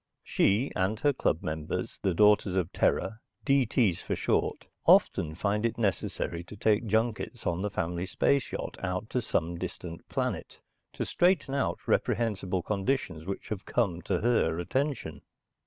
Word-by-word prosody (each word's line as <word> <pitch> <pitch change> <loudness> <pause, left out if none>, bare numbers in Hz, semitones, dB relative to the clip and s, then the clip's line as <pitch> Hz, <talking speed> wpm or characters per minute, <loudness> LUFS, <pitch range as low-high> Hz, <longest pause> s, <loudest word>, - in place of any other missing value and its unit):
She 105 +8 +2
and 100 +3 0
her 145 -1 +3
club 85 -10 0
members, 80 0 -3
the 95 -3 +1
Daughters 105 -1 +4
of 90 -3 0
Terra 110 - +1 0.3
(D.T.s 125 - +3
for - - -2
short), - - 0 0.2
often 80 0 +4
find 105 +4 0
it 115 - 0
necessary 90 -4 -1
to 105 - -10
take 110 +2 +2
junkets 110 +2 -1
on 85 +1 0
the 105 - -1
family 90 -1 -2
space 135 +8 +1
yacht - - -5
out 90 +3 -3
to 125 - +1
some 85 -6 -1
distant 85 -1 -7
planet - - -3 0.3
to - - -3
straighten 175 -6 +2
out 140 - -1
reprehensible 95 -6 0
conditions 95 - -1
which 100 +4 -5
have 105 -3 -4
come 95 -8 0
to 90 +2 -1
her 110 -8 +2
attention. 135 - -2
100 Hz, 155 wpm, -29 LUFS, 90-120 Hz, 0.3 s, Daughters